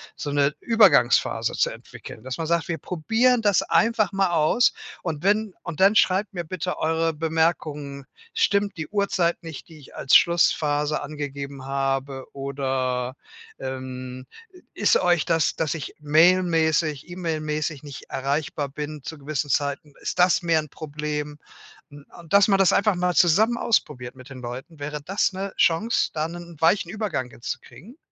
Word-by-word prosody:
so 145 - -5
'ne 145 +1 +2
Übergangsphase 195 - +3
zu - - +1
entwickeln, 110 - -11
dass 130 +2 -6
man 165 - -2
sagt: 170 0 0
„Wir 165 -2 -3
probieren 225 - +1
das 205 -3 +3
einfach 230 -2 +2
mal 195 -2 +1
aus. 165 +9 +3 0.3
Und 160 -4 -3
wenn 210 0 +1
und 170 -3 -6
dann 200 +2 +6
schreibt 195 0 +2
mir 175 -2 -4
bitte 180 +2 -4
eure 165 +1 +1
Bemerkungen. 155 -3 -1 0.3
Stimmt 200 - +1
die 160 - -4
Uhrzeit 185 -4 0
nicht, 160 -3 -9
die 160 - -14
ich 140 - -16
als 135 - +3
Schlussphase 150 -3 +3
angegeben 140 -2 -6
habe? 135 0 -2
Oder, 130 -2 -2 0.4
ähm, 130 -1 -6 0.5
ist - - +3
euch 175 -3 +2
das, 165 -4 +1
dass 160 -2 -1
ich 155 - -6
mailmäßig, 160 -1 +3
E-Mail-mäßig 155 -4 -3
nicht 145 -2 -9
erreichbar 140 +1 -2
bin, 150 +1 -6
zu 160 - -7
gewissen 145 0 -3
Zeiten, 145 +2 -1
ist - - -4
das 180 +1 +4
mehr 165 -2 +2
'n 150 - -11
Problem?“ 150 0 -5 0.5
N 145 0 -13
und 170 -2 -15
dass 200 0 +6
man 195 - +4
das 190 - +5
einfach 200 -1 +3
mal 180 0 0
zusammen 215 +8 +4
ausprobiert 140 - -1
mit 130 +1 -13
den 135 -1 -9
Leuten. 125 +6 -8
Wäre 150 +1 -5
das 195 +3 0
'ne 195 +1 -5
Chance, 200 +8 +2
da 155 0 -1
'nen 170 0 -9
weichen 175 +2 +3
Übergang 205 - -3
hinzukriegen? 165 - -9
155 Hz, 160 wpm, -24 LUFS, 140-180 Hz, 0.5 s, dann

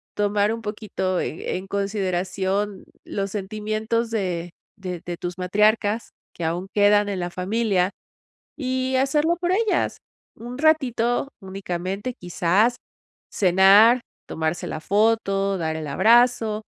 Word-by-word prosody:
tomar 205 +1 +1
un 230 - -6
poquito, 210 -4 -3
eh, 160 - -3
en 190 - -8
consideración, 195 0 -2 0.2
los 195 0 -3
sentimientos 215 +3 -2
de 175 -5 -2 0.3
de 180 -4 -6
de 175 -1 -4
tus 175 +1 -5
matriarcas, 210 +4 +1 0.2
que 175 - -6
aún 170 +3 -2
quedan 205 0 +4
en 190 -2 -3
la 175 - -2
familia. 190 0 0 0.7
Y 260 -2 -1
hacerlo 300 +6 +2
por 355 0 0
ellas. 430 +2 +1 0.4
Un 245 +3 -8
ratito 260 -6 +2
únicamente. 190 +3 -4
Quizás, 185 +7 +2 0.6
cenar, 200 +6 +6 0.3
tomarse 160 +1 -2
la 155 - -5
foto, 200 0 +1
dar 160 -1 -2
el 155 -1 -5
abrazo. 225 - +3
205 Hz, 120 wpm, -23 LUFS, 185-230 Hz, 0.7 s, cenar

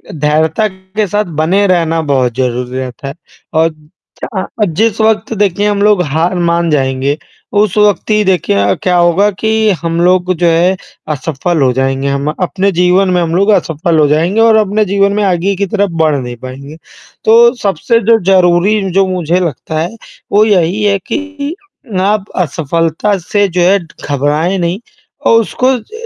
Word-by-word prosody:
धैर्यता 155 +7 +1
के 190 +2 -4
साथ 205 +3 -1 0.2
बने 195 +5 +2
रहना 165 -3 +1
बहुत 125 -3 0
ज़रूरी 125 0 -2
रहता 130 +1 -7
है 135 - -5 0.4
और 160 +1 +2 0.5
च - - 0
अ, 190 - -1 0.2
जिस 215 +6 0
वक़्त 220 0 +1
देखिए 205 0 +1
हम 205 -1 0
लोग 210 -3 +3
हार 160 +5 -1
मान 170 0 0
जाएँगे, 135 0 0 0.4
उस 205 -1 +1
वक़्त 210 0 +2
ही 210 0 +3
देखिए 185 - +1
अ, 100 0 +2
क्या 180 -1 +2
होगा 175 +4 +3
कि 220 +2 0
हम 165 0 -1
लोग 180 +1 +2
जो 175 - +1
है 170 +3 +2 0.4
असफल 160 +3 -2
हो 130 -2 +3
जाएँगे, 135 +1 -1
हम 140 +1 -1
अपने 190 +2 0
जीवन 180 +2 +2
में 180 -1 +1
हम 165 0 -1
लोग 200 +3 +2
असफल 165 -3 0
हो 150 - +4
जाएँगे 165 +8 +1
और 225 -1 +5
अपने 210 0 +1
जीवन 200 +1 +1
में 210 - 0
आगे 190 +1 0
की 200 +2 -1
तरफ़ 200 -1 -1
बढ़ 155 -2 +2
नहीं 125 -2 -5
पाएँगे, 135 +5 -10 0.5
तो 235 +2 +6
सबसे 200 +4 +1
जो 225 - +5
ज़रूरी 185 +3 +3
जो 195 +1 +2
मुझे 180 -1 -1
लगता 160 -2 -3
है 175 +8 -3 0.4
वो 210 +2 +4
यही 195 0 +1
है 200 -1 +2
कि 295 +1 -4 0.5
आप 205 +1 0
असफलता 165 +4 -1
से 200 +3 0
जो 180 0 -1
है 190 +3 +4 0.3
घबराएँ 150 +6 0
नहीं 175 +2 -1 0.5
और 230 - +5
उसको 255 +3 0
ज 445 - -11
180 Hz, 175 wpm, -12 LUFS, 160-205 Hz, 0.5 s, तो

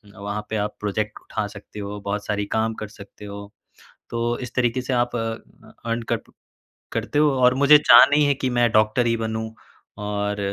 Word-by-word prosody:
वहाँ 100 0 -4
पे 110 - -3
आप 105 0 -2
प्रोजेक्ट 105 +1 -3
उठा 110 - -4
सकते 100 +1 -11
हो, 100 0 -5
बहुत 100 +1 -3
सारी 105 0 -1
काम 110 0 +1
कर 110 - -4
सकते 105 -1 -13
हो। 100 0 -9 0.6
तो 120 0 -1
इस 125 - -7
तरीके 125 0 +1
से 130 +1 -4
आप 120 0 0
अ, - - -1 0.7
अर्न 115 +1 -1
कर - - +3
प - - -17 0.6
करते 145 - -1
हो 150 -1 +4
और 125 0 +6
मुझे 140 +2 +7
चाह 120 -4 +8
नहीं 150 0 +4
है 140 - +3
कि 130 0 -2
मैं 120 -1 +4
डॉक्टर 110 +2 +3
ही 115 - +2
बनूँ 110 0 -4 0.5
और 105 0 -2
110 Hz, 200 wpm, -23 LUFS, 105-120 Hz, 0.7 s, चाह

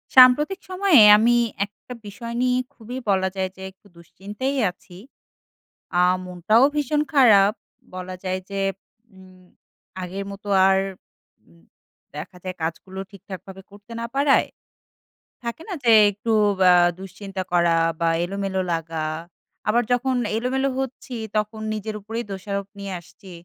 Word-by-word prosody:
সাম্প্রতিক 295 +9 +7
সময়ে 370 - +5 0.2
আমি 235 +3 +4 0.3
একটা 205 +4 -13
বিষয় 230 +3 -7
নিয়ে 250 0 +2 0.2
খুবই 245 0 -8
বলা 190 -1 +2
যায় 190 -1 -1
যে 190 - -13
একটু 190 +2 -25
দুশ্চিন্তায় 205 +10 -5
আছি। 180 0 -17 1.0
আ - - +6 0.2
মনটাও 180 +6 +2
ভীষণ 295 0 +1
খারাপ 215 -7 +6 0.4
বলা 185 0 -6
যায় 185 0 -2
যে 195 0 -3 0.5
উম 185 -1 -17 0.6
আগের 190 +2 -5
মতো 200 +1 -11 0.2
আর 190 0 +4 0.7
উ - - -22 0.6
দেখা 160 +5 -8
যায় 185 -1 -5
কাজগুলো 185 +4 -5
ঠিকঠাকভাবে 195 -1 -10
করতে 205 +3 -16
না 230 - -3
পারায়। 280 0 +3 1.0
থাকে 235 +6 -5
না? 380 - -3
যে 230 -2 +5 0.2
একটু 215 +3 -4 0.4
আ - - +7 0.3
দুশ্চিন্তা 195 0 -6
করা 170 -1 +3 0.2
বা 165 - +2 0.2
এলোমেলো 195 0 -2
লাগা। 165 -1 -3 0.6
আবার 240 +3 +3
যখন 255 +1 +1 0.2
এলোমেলো 265 +3 0
হচ্ছি 260 -1 -5 0.2
তখন 215 +1 -2
নিজের 215 0 -5
উপরেই 225 +4 -5
দোষারোপ 200 +1 -4
নিয়ে 200 -1 -5
আসছি। 185 +3 -16
200 Hz, 135 wpm, -23 LUFS, 190-240 Hz, 1.0 s, সাম্প্রতিক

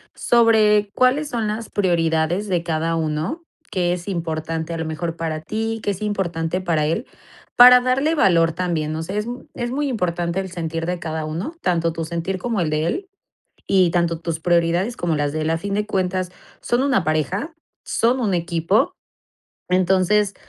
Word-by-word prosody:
sobre 215 -3 +4
cuáles 270 +4 +2
son 230 -4 -2
las 215 +2 -4
prioridades 170 0 +1
de 180 -3 0
cada 165 0 -1
uno, 160 - -2 0.3
¿qué 175 -2 +1
es 180 +1 -6
importante 165 -2 -3
a - - -3
lo 165 - -3
mejor 165 +1 -3
para 160 -2 -3
ti? 225 +6 -3
¿Qué 205 - 0
es 195 - -6
importante 180 -5 -1
para 165 -4 +1
él?, 215 - -1 0.5
para 250 0 +9
darle 270 +5 +1
valor 170 - +4
también. 165 -3 -2
O 160 - -3
sea, 185 +5 -5
es 210 +2 -2 0.3
es 240 0 -3
muy 285 +2 -1
importante 175 -5 -1
el 190 -1 -4
sentir 165 -2 -3
de 180 - -1
cada 160 -1 -4
uno, 165 - -4
tanto 170 - +1
tu 165 - -4
sentir 170 +3 -3
como 225 -1 -1
el 160 - 0
de 155 +1 0
él, 385 - -3 0.6
y 185 -3 +4
tanto 170 -1 0
tus 165 -1 -3
prioridades 175 +6 +1
como 170 -3 -1
las 145 -1 -1
de 155 - -2
él. 155 - -1
A 165 - +2
fin 200 +4 -5
de 210 +1 -1
cuentas, 185 -2 -1 0.3
son 240 +2 0
una 270 -9 +2
pareja, 165 - -1 0.3
son 245 +3 +1
un 210 -6 +1
equipo. 175 - +1 0.8
Entonces, 190 +2 +2
180 Hz, 180 wpm, -21 LUFS, 165-210 Hz, 0.8 s, para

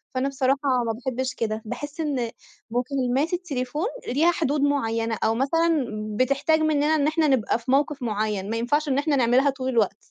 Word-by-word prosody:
فأنا 265 +2 0
بصراحة 270 0 +1 0.3
ما 225 - 0
باحبّش 260 +2 -3
كده، 220 -1 -2
باحس 290 +7 -6
إن 255 -7 -1 0.4
مكالمات 260 +5 0
التليفون 295 -2 -2 0.2
ليها 310 +8 +3
حدود 295 -4 0
معيّنة 230 -6 0
أو 225 +1 +2
مثلًا 315 +2 +2 0.3
بتحتاج 275 +5 +2
منّنا 310 0 +2
إن 295 -1 +2
إحنا 315 0 +2
نبقى 240 -4 +1
في 255 +2 -4
موقف 285 0 +1
معيّن، 210 -2 -2
ما 225 - -1
ينفعش 290 +6 0
إن 265 - +1
إحنا 290 0 +1
نعملها 255 +3 +3
طول 260 -1 -3
الوقت. 215 -5 +1
265 Hz, 170 wpm, -24 LUFS, 235-295 Hz, 0.4 s, ليها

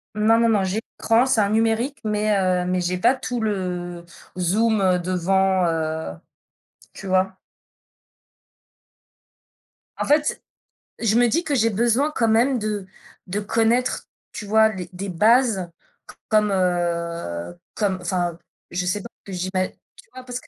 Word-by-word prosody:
non, 220 +2 +4
non, 230 0 +3
non, 205 -3 +2
j'ai 190 +3 -1 0.2
l'écran, 230 +3 +3
c'est 260 -4 +2
un 200 - +1
numérique, 225 +5 +1
mais 215 0 0
heu, 185 -1 +1
mais 180 0 0
j'ai 180 +1 -1
pas 255 - +4
tout 245 -2 -4
le 180 -4 -3 0.3
zoom, 210 +5 +2
heu, 185 -2 +3
devant, 185 +1 +1
heu, 160 - -2 0.8
tu 195 - -9
vois? 190 0 +1 2.6
En - - -2
fait, 300 +1 +2 0.6
je 220 -2 +1
me 245 0 +5
dis 330 +9 +1
que 295 -4 -1
j'ai 230 -3 +3
besoin 240 +7 +1
quand 230 - +2
même 245 +4 +3
de 210 -2 -3 0.4
de 195 +3 -2
connaître, 225 +4 +1 0.3
tu 210 - -7
vois, 220 +1 +4
les 185 -5 -6
des 195 +2 -5
bases 215 0 +3 0.4
c - - -12
comme, 215 -1 +3
heu, 170 - -2 0.2
comme 195 -3 0
enfin, 175 -1 -1 0.3
je 180 +1 -2
sais 190 +3 -1
pas 235 - -9 0.2
ce - - -7
que 185 - -4
j'ima 185 +1 -1
tu - - -22
vois, 255 - -9
parce 250 0 -5
que, - - -20
200 Hz, 160 wpm, -22 LUFS, 180-225 Hz, 2.6 s, me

